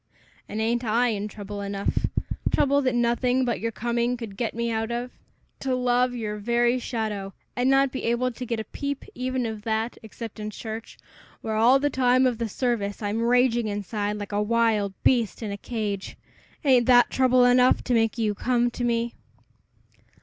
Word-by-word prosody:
"And 210 - -4
ain't 235 +2 0
I 240 +2 +2
in 210 -2 -2
trouble 205 -1 -7
enough 200 0 -1 0.4
trouble 280 0 +3
that 255 -2 0
nothing 245 +2 +2
but 240 - -1
your 230 - -2
coming 235 +2 -1
could 225 -4 -7
get 225 +1 -3
me 235 0 -1
out 225 0 -1
of? 240 +1 -3 0.5
To 265 -1 -1
love 250 0 +1
your 210 -3 -3
very 240 +3 +2
shadow, 215 -5 -4 0.2
and 245 +2 +2
not 270 0 +4
be 260 - -4
able 240 +2 +1
to 250 +1 -7
get 230 -1 -2
a - - -2
peep 280 +4 -5
even 255 0 -2
of 220 -2 -4
that, 220 +2 -2
except 225 0 -9
in 215 0 -4
church, 220 +1 -7 0.4
where 220 - -3
all 235 +5 +6
the 290 +1 0
time 255 0 +3
of 245 -3 +1
the 230 -1 -2
service 215 -3 -2
I'm 210 +2 -1
raging 240 -1 +3
inside 205 0 -2
like 205 0 -6
a 205 0 0
wild 215 -3 +1
beast 235 -3 +2
in 210 - -3
a - - -3
cage 205 -3 -4 0.5
ain't 255 -3 +4
that 245 -1 +6
trouble 255 -1 +4
enough 250 +1 +4
to 250 - -1
make 225 0 +2
you 215 -2 +1
come 240 +2 +1
to 245 - -5
me?" 235 0 0
235 Hz, 185 wpm, -25 LUFS, 215-250 Hz, 0.5 s, all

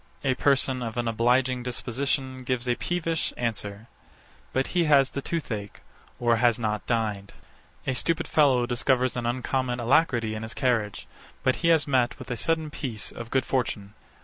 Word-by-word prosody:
A 135 -2 +2
person 130 -1 +2
of 115 0 -4
an 120 -1 0
obliging 125 +3 +2
disposition 130 +2 -2
gives 125 0 -2
a 120 - +3
peevish 165 +3 -1
answer: 110 -3 -3 0.7
But 130 +1 +1
he 175 -2 +3
has 140 -3 +5
the 140 - -3
toothache, 110 -11 -4 0.4
or 120 -1 +3
has 120 -1 +3
not 105 -3 -2
dined. 105 -4 -1 0.5
A 130 - 0
stupid 165 +6 0
fellow 135 -5 +4
discovers 125 +1 +1
an 120 -1 -2
uncommon 125 0 -1
alacrity 120 -3 +2
in 110 - -5
his 110 0 -6
carriage: 115 -6 0 0.4
But 130 - +2
he 170 - 0
has 160 -3 +4
met 130 -3 +2
with - - -9
a - - 0
sudden 160 +5 0
piece 115 -9 -3
of 115 -1 -8
good 130 -1 +1
fortune. 105 -6 -2
125 Hz, 170 wpm, -26 LUFS, 115-135 Hz, 0.7 s, has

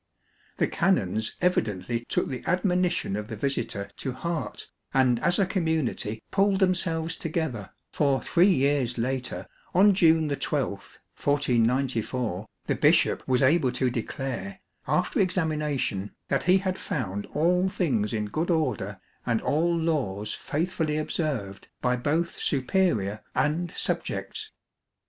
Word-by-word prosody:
The - - +3
canons 110 - +1
evidently 115 - 0
took - - +1
the 130 -2 -4
admo 180 +1 +1
nition 175 - -1
of 105 0 -4
the 110 - -5
visitor 105 -5 -2
to 130 - -3
heart 170 +5 -4 0.3
and 130 -3 +4
as 175 +8 +1
a 195 - +3
community 160 - -1
pulled 195 0 +3
themselves 165 -4 +1
together, 160 - -3 0.2
for 140 -3 +2
three 180 +3 +4
years 135 -5 +1
later, 130 +2 -2 0.3
on 200 +3 +7
June 160 -4 +4
12, 140 -2 0 0.5
1494, 125 -5 +1 0.2
the - - +1
bishop - - +3
was 130 +1 +3
able 135 -1 +4
to 125 0 +1
declare, 120 -4 -4 0.3
after - - +1
examination, 150 - 0
that - - 0
he 185 - +7
had 190 -1 -2
found 100 -7 -3
all 180 +5 +3
things 120 - 0
in 105 -2 -1
good 155 - -2
order 130 - 0 0.3
and 115 -2 +2
all 170 +3 +2
laws 125 -11 -1
faithfully 160 -1 -1
observed 135 - -3
by 125 0 +1
both 155 +7 -1
superior 130 - +1
and 150 +7 +1
subjects. 435 - -3
145 Hz, 130 wpm, -27 LUFS, 115-170 Hz, 0.5 s, on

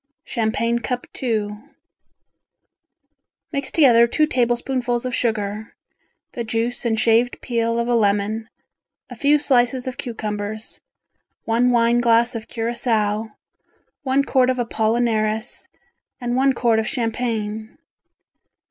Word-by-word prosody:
Champagne 230 0 0
Cup 250 +1 -3 0.2
II 210 -4 -1 1.9
Mix 280 -1 -3
together 235 -7 +5
two 305 +6 +2
tablespoonfuls 245 -2 0
of 250 - -3
sugar, 215 -2 -2 0.6
the 235 - -4
juice 230 +2 -2
and 225 -2 +1
shaved 230 +2 +2
peel 230 -1 -1
of 235 0 0
a 245 - +1
lemon, 215 0 +1 0.6
a - - -7
few 290 +1 +4
slices 255 -3 +2
of 255 -1 -5
cucumbers, 215 -2 -5 0.6
one 235 +2 +2
wine 235 0 +3
glass 235 0 +3
of 230 -1 -6
Curacao, 225 -2 -1 0.7
one 275 -1 +1
quart 260 -2 +2
of 255 - 0
apollinaris 220 -1 -1 0.5
and 245 0 -2
one 270 +1 +3
quart 235 -3 +2
of 220 - -2
champagne. 225 -2 -3
235 Hz, 115 wpm, -21 LUFS, 220-245 Hz, 1.9 s, together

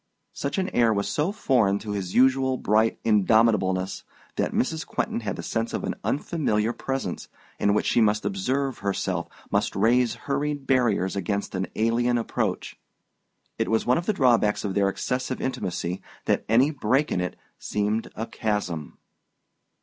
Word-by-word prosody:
Such 140 +5 -3
an 190 -1 0
air 120 -9 +3
was 100 -1 0
so 155 +6 0
foreign 120 - +2
to 105 0 -6
his 95 -3 -4
usual 130 0 +4
bright 110 +1 +2
indomitableness 105 -3 +2 0.3
that - - 0
Mrs. 160 +5 0
Quentin - - -2
had 105 -3 -3
the - - -6
sense 115 0 -2
of - - -3
an - - -1
unfamiliar 120 -8 0
presence, 135 -10 -4 0.3
in 100 0 +3
which - - +1
she 120 - +3
must 105 -1 +2
observe 140 -9 -1
herself, 95 -3 -2 0.2
must - - 0
raise 120 +1 +3
hurried 145 0 -1
barriers 120 -9 +2
against 100 +1 -2
an 95 -1 -2
alien 120 +2 +2
approach. 115 - -2 0.8
It - - 0
was 110 0 +1
one 125 +5 +3
of 175 - -7
the 215 - +3
drawbacks 120 - +3
of 100 - -2
their 100 0 +2
excessive 130 +5 -2
intimacy 90 -7 -3 0.2
that - - +1
any 125 +7 +4
break 135 +1 +1
in 90 - 0
it 90 - -3 0.2
seemed 105 +2 -1
a 115 - -3
chasm. 105 -10 -3
115 Hz, 160 wpm, -25 LUFS, 100-130 Hz, 0.8 s, usual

